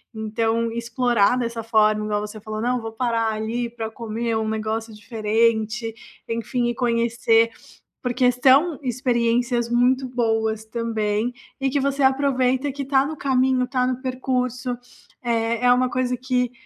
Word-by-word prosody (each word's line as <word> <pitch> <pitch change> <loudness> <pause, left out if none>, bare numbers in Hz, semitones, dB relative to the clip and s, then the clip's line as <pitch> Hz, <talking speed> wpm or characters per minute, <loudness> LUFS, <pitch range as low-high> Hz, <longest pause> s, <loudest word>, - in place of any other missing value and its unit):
então 225 +1 -1
explorar 235 -1 +2
dessa 235 -2 -2
forma, 215 -1 +2
igual 210 -1 -1
você 210 0 -7
falou: 215 0 -5
"Não 245 +2 0
vou 225 0 -5
parar 230 -1 0
ali 225 +3 -2
para 225 -1 -5
comer 230 0 -3
um 220 0 -1
negócio 220 0 -3
diferente, 220 +1 0 0.3
enfim, 235 +2 -1
e - - -1
conhecer", 230 -1 +2 0.5
porque 250 0 +2
são 270 +6 +4
experiências 240 -1 0
muito 250 +2 +2
boas 225 -3 0
também, 220 0 -1 0.3
e 270 - +2
que 285 +2 0
você 275 +1 0
aproveita 265 0 +2
que 280 +1 -6
está 270 0 +2
no 310 +2 -4
caminho, 260 -2 +2
está 255 0 0
no 255 0 -2
percurso, 255 -1 -2 0.5
eh, 230 0 0
é 245 - +6
uma 250 +1 +4
coisa 250 0 -1
que 250 -1 0
235 Hz, 150 wpm, -23 LUFS, 225-255 Hz, 0.5 s, é